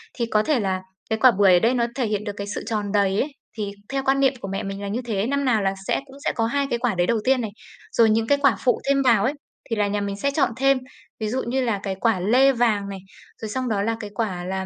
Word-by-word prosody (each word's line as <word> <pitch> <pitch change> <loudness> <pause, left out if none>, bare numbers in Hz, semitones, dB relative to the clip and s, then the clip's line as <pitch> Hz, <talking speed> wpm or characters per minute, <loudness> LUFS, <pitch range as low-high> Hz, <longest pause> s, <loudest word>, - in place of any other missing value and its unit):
Thì 235 - -1
có 215 -2 +1
thể 280 0 +1
là 190 -2 -1 0.3
cái 220 - 0
quả 255 +2 +7
bưởi 195 -3 +4
ở 175 - +6
đây 235 +5 +2
nó 235 -2 +1
thể 255 -4 0
hiện 210 -1 -1
được 205 - -4
cái 200 - -5
sự - - -4
tròn 210 -3 -2
đầy 200 -1 +2
ấy, 295 - -3 0.3
thì 205 -2 -3 0.2
theo 270 0 -2
quan 270 +1 +3
niệm 270 -1 +4
của - - -6
mẹ 195 +2 -3
mình 195 +1 -5
là 200 - -4
như 225 +5 -2
thế. 210 -1 -1
Năm 280 0 0
nào 225 -4 +2
là 195 0 +1
sẽ - - +1
cũng 270 - -15
sẽ - - +2
có 225 - +1
2 280 +4 0
cái 240 - -1
quả 235 -5 0
đấy 175 0 +1
đầu 230 -1 +2
tiên 260 -1 +3
này. 220 - -4 0.4
Rồi 225 -2 +4
những 225 +1 +2
cái 285 - +4
quả 270 -7 +4
phụ 245 - +2
thêm 275 0 +3
vào 235 -6 +4
ấy, 260 - +1 0.4
thì 225 - 0
là 205 -1 +1
nhà 205 0 -1
mình 200 -1 -3
sẽ 280 +6 0
chọn 280 -4 +1
thêm, 270 0 +4 0.4
ví 215 - -2
dụ 255 +4 -1
như 260 +2 0
là, 230 -5 0
cái 195 -1 -2
quả 225 -5 +2
lê 250 +9 +4
vàng 225 -5 +1
này, 195 -1 -6 0.4
rồi 220 - -4
xong 255 +2 -2
đó 205 -3 0
là 225 +2 0
cái 210 -2 -6
quả 185 -6 -2
là 190 0 -3
225 Hz, 300 wpm, -23 LUFS, 200-255 Hz, 0.4 s, quả